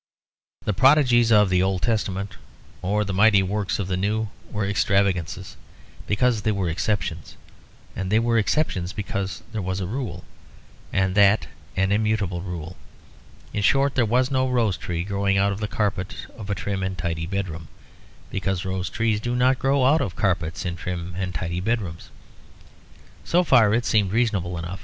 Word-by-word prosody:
The 105 - +1
prodigies 125 -2 +5
of 105 -3 +5
the 90 0 +3
Old 95 -1 0
Testament 100 -4 -1 0.5
or 105 +3 0
the 100 - -3
mighty 100 0 +5
works 100 +1 -1
of 100 - -3
the 95 - -1
New 105 +3 -1 0.2
were 105 -1 -2
extravagances 95 -3 0 0.5
because 120 +1 +2
they 110 - +1
were 95 -4 -1
exceptions; 90 -2 -2 0.6
and 95 0 -3
they 110 - +4
were 115 0 +2
exceptions 100 - 0
because 100 -3 -4
there 110 -2 -3
was 95 +1 -2
a 95 - -2
rule, 120 +6 -4 0.7
and 95 -1 +1
that 100 +1 +5 0.3
an 95 +1 +2
immutable 105 -4 0
rule. 90 -2 -6 0.8
In 105 - -1
short, 135 +6 +3
there 120 - +2
was 125 +4 +2
no 130 -1 +1
rose 115 -6 +2
tree 85 0 -3
growing 100 0 0
out 100 +1 +3
of 100 - -4
the 105 - -2
carpet 100 -3 -2 0.2
of 105 -3 -9
a 100 - 0
trim 100 -1 -3
and 95 0 -3
tidy 80 -1 -2
bedroom; 90 -4 -4 0.6
because 95 0 -2
rose 95 -1 -2
trees 110 -1 0
do 120 +3 -2
not 125 +1 +3
grow 135 -1 +2
out 150 +5 +4
of 90 - -3
carpets 85 -4 -1
in 90 -1 -3
trim 90 -1 -5
and 90 -1 -3
tidy 85 +2 -2
bedrooms. 95 -5 -3 1.1
So 180 +1 +2
far 120 -10 +5
it 120 +1 0
seemed 105 -5 +2
reasonable 100 -7 0
enough. 85 +3 -5
100 Hz, 170 wpm, -24 LUFS, 95-110 Hz, 1.1 s, prodigies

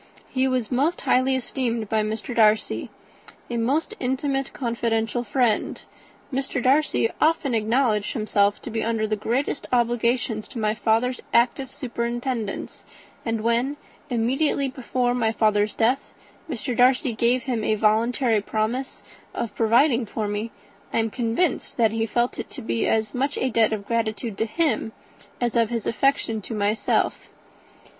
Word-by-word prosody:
He 260 0 +2
was 255 -3 -1
most 290 +8 +1
highly 260 +1 +3
esteemed 240 -3 -2
by 220 +1 +1
Mr. 220 +3 -3
Darcy, 215 -1 +3 0.6
a 240 - -1
most 280 - 0
intimate, 270 +1 -1
confidential 230 -1 -1
friend. 230 -1 +1 0.5
Mr. 270 0 -1
Darcy 260 -2 +2
often 310 -4 +2
acknowledged 220 -1 +1
himself 205 -3 +1
to 245 - -6
be 225 0 -1
under 225 -1 0
the 215 0 0
greatest 240 +7 -2
obligations 240 -2 +1
to 255 - -10
my 215 -1 +1
father's 230 +3 +1
active 255 +2 +2
superintendence; 240 -4 -4 0.4
and 225 -2 -1
when, 240 +5 +1 0.3
immediately 265 +4 +1
before 255 -1 -1
my 230 -3 +1
father's 210 -1 +2
death, 250 +5 0 0.3
Mr. 250 -2 -3
Darcy 250 0 +4
gave 240 +2 +2
him 240 -5 -2
a 215 - +2
voluntary 225 +2 +2
promise 220 +6 -2 0.3
of 230 - -3
providing 235 +2 +3
for 215 0 -3
me, 205 +2 -3 0.4
I - - -1
am 225 -1 +1
convinced 240 - -1
that 225 -3 +4
he 225 0 -1
felt 240 +3 0
it - - -5
to - - -9
be 115 0 0
as 220 -1 +1
much 275 +3 -1
a 260 - 0
debt 225 -1 +3
of 210 -2 -3
gratitude 220 -2 -2
to 225 - +2
him 230 -5 0 0.5
as 240 -1 -1
of 230 -1 +2
affection 230 0 0
to 225 - -6
myself." 210 +1 0
235 Hz, 150 wpm, -24 LUFS, 220-255 Hz, 0.6 s, Darcy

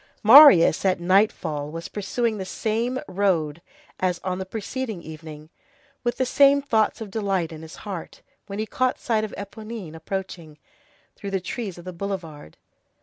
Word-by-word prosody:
Marius, 220 - +8
at 185 -2 +2
nightfall, 175 -5 +1
was 165 +2 -6
pursuing 215 +2 -2
the - - -3
same 230 +6 -2
road 175 -5 0 0.4
as 180 -2 0
on 185 0 -2
the 190 - -5
preceding 220 -1 -5
evening, 155 0 -10 0.5
with 240 0 -1
the 260 - +1
same 280 +2 +5
thoughts 230 -6 0
of 210 -3 -7
delight 195 -6 -1
in 160 -1 -9
his 160 0 -10
heart, 190 -5 -7 0.2
when 200 0 -6
he 215 - -1
caught 255 +3 0
sight 220 -3 0
of 215 - -4
Éponine 210 -3 -8
approaching, 165 -2 -6 0.6
through 200 - -7
the 195 -1 -1
trees 195 +1 -5
of 175 - -12
the 185 - -6
boulevard. 170 - -6
195 Hz, 160 wpm, -24 LUFS, 170-220 Hz, 0.6 s, Marius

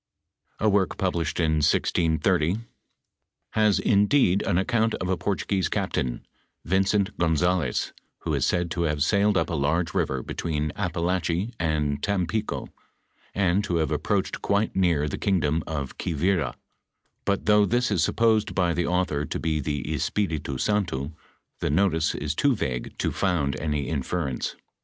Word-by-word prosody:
f - - -1
A - - +5
work 100 -2 +2
published 90 -3 -1
in 80 -2 +2
1630,:(: 80 +4 +2 0.9
has 105 -2 +3
indeed 100 -1 +3
an 85 - +2
account 110 +4 +1
of 95 - -4
a 95 - +2
Portuguese 95 -2 -1
captain, 60 -2 -2 0.4
Vincent 95 +3 +1
Gonzalez, 85 -3 +1 0.3
who - - -2
is - - +1
said 85 -1 0
to 85 - -2
have 75 -3 +1
sailed 100 +2 +3
up 80 +1 0
a - - -2
large 80 +3 0
river 65 -2 -1
between 75 -2 -2
Apalache 90 +4 -1
and 75 -3 0
Tampico, 105 +3 -1 0.7
and 95 0 +2
to 90 - -1
have 80 -2 0
approached 95 +6 -1
quite 100 +2 0
near 85 -6 +2
the - - -4
kingdom 80 -5 +1
of 70 -5 -4
Quivira, 85 -4 0 0.7
but 100 -1 -1
though 105 -1 +5
this 120 0 +1
is 90 -6 +2
supposed 110 0 +2
by 90 -3 +2
the 85 0 0
author 90 -5 0
to - - -3
be 80 -1 0
the 75 0 -2
Espiritu 75 -2 -1
Santo, 85 -6 -1 0.5
the - - -1
notice 80 0 +2
is 75 0 -2
too 140 - +2
vague 65 - -4
to - - 0
found 80 -8 0
any 75 -2 -1
inference. 70 -2 -2
85 Hz, 150 wpm, -25 LUFS, 75-100 Hz, 0.9 s, A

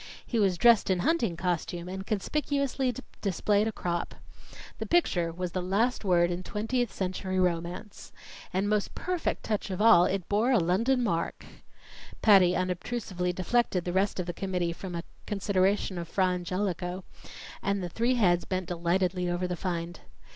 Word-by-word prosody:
He 235 - -1
was 190 -4 +2
dressed 235 +2 +5
in 185 -2 +2
hunting 230 - +1
costume 175 -1 -2
and 190 +1 -6
conspicuously 275 +4 0 0.3
displayed 205 +2 +1
a - - -1
crop. 175 -4 -3 0.6
The - - -4
picture 175 - +2
was 180 +1 -4
the 185 - -2
last 210 +8 0
word 175 -3 +3
in 175 +1 -3
Twentieth 225 +4 -2
Century 185 0 -2
Romance. 180 +3 -2 0.4
And, 190 +2 0
most 210 -1 0
perfect 360 -2 -2
touch 210 -2 -2
of 185 - -4
all, 195 -5 +7
it 185 -2 -2
bore 215 +5 +2
a - - +5
London 225 +9 +2
mark! 170 -7 -2 0.8
Patty 190 -4 +6
unobtrusively 185 0 -2
deflected 185 0 0
the 175 - -2
rest 195 +1 +1
of 180 - -1
the 175 - -4
committee 180 -2 -2
from 180 0 -7
a 170 - -4 0.2
consideration 195 -2 +1
of 170 - -5
Fra 190 +2 +1
Angelico, 180 0 -2 0.6
and 200 -1 -1
the - - -2
three 235 +8 +1
heads 175 -7 +3
bent 185 -1 -2
delightedly 180 +1 0
over 175 +1 -1
the 180 - -2
find. 175 -1 -4
185 Hz, 160 wpm, -28 LUFS, 175-210 Hz, 0.8 s, all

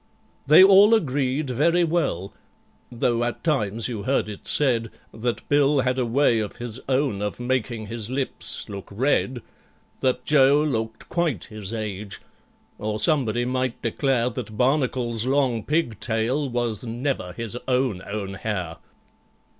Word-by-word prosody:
They 155 +6 +9
all 200 +3 +7
agreed 140 - -1
very 165 +7 +3
well, 155 - -1 0.6
though 120 0 0
at 120 0 -3
times 115 -8 0
you 115 -5 -4
heard 130 0 0
it 105 - -9
said 120 -6 +2 0.2
That 120 +1 -3
BILL 145 -1 +3
had 130 0 0
a 125 - 0
way 120 -1 +3
of 105 -2 -4
his 120 0 -4
own 130 -6 +1
of 105 +2 -3
making 120 -3 -2
his 115 0 -5
lips 130 +1 -1
look 100 -2 -8
red— 125 +2 0 0.6
That 125 -1 0
JOE 145 0 +5
looked 110 -6 -3
quite 160 - -1
his 105 -2 -7
age—or 105 0 -7
somebody 120 -5 +2
might 130 -1 -2
declare 125 +1 0
That 110 -3 -7
BARNACLE'S 125 -3 +1
long 130 -5 +1
pig 145 -9 -1
tail 120 +6 -1
was 120 -3 -2
never 120 -5 -3
his 115 +3 -4
own 125 -7 0
own 100 -2 -4
hair. 90 -5 -4
120 Hz, 140 wpm, -24 LUFS, 110-135 Hz, 0.6 s, They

